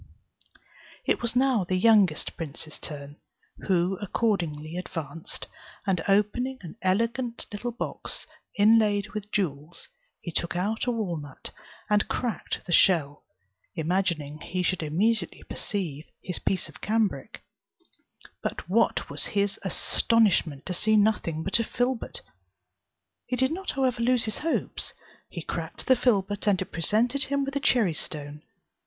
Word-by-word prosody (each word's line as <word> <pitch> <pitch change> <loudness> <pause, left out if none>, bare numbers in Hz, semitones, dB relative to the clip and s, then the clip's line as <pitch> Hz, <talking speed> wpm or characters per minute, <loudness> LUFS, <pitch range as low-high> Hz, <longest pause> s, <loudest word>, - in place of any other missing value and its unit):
It - - +1
was 235 0 0
now 255 -5 +3
the 185 +1 -1
youngest 195 -5 +4
prince's 155 -1 -6
turn, 145 -1 -7 0.5
who 185 0 +2
accordingly 170 -7 -1
advanced, 165 -3 -5 0.4
and 185 -5 +1
opening 210 +6 +2
an 170 - -8
elegant 230 +5 0
little 215 +4 -3
box 235 - -4 0.3
inlaid 210 -1 +4
with 210 0 -6
jewels, 155 -4 -3 0.3
he 170 - -6
took 170 +1 -1
out 210 +7 -1
a - - +3
walnut, 170 - -4 0.4
and 210 0 +3
cracked 240 -3 -2
the 180 - -5
shell, 155 -5 +4 0.5
imagining 160 -3 0
he 185 0 -2
should 185 0 +1
immediately 180 +5 0
perceive 165 -7 -3 0.2
his 180 - -3
piece 190 - 0
of - - -14
cambric; 210 -10 -1 1.0
but - - -4
what 230 +6 +2
was - - -2
his 200 0 +1
astonishment 190 -6 +2
to 185 - -3
see 215 +5 +3
nothing 205 -7 +2
but 195 +6 +1
a - - +2
filbert! 245 +1 -2 1.1
He 250 - 0
did 260 +3 +2
not 380 +4 -4
however 255 -3 +1
lose 245 -1 +3
his 215 -2 -2
hopes; 325 +1 -2 0.3
he - - -6
cracked - - -5
the 260 - +6
filbert, 205 -4 +1
and 195 -3 +4
it 190 - -4
presented 235 +10 +1
him 280 0 0
with 275 0 -5
a - - +2
cherry 230 - +3
stone. 150 -1 -6
200 Hz, 140 wpm, -27 LUFS, 170-230 Hz, 1.1 s, the